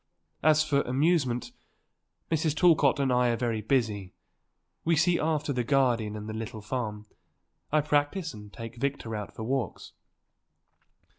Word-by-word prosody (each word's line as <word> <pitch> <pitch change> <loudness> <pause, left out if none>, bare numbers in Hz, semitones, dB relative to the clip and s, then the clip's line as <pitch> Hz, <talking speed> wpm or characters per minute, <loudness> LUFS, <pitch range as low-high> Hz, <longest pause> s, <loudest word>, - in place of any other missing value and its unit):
As 155 0 +5
for 145 -2 +2
amusement, 135 -3 +1 0.8
Mrs. 160 -1 +1
Talcott 155 -4 +4
and 135 -2 +2
I 125 0 +3
are 120 - +2
very 115 -3 -1
busy; 105 -5 0 0.7
we 165 0 +3
see 170 +2 +3
after 155 -2 0
the 125 -1 0
garden 120 -5 +1
and 105 0 -6
the 110 - -5
little 110 -1 -6
farm; 105 -3 -4 0.7
I 155 0 +4
practice 150 +3 0
and 105 -1 -11
take 115 +1 -8
Victor 135 -4 -2
out 105 -1 -6
for 110 - -5
walks." 125 -3 -3
130 Hz, 145 wpm, -28 LUFS, 110-150 Hz, 0.8 s, As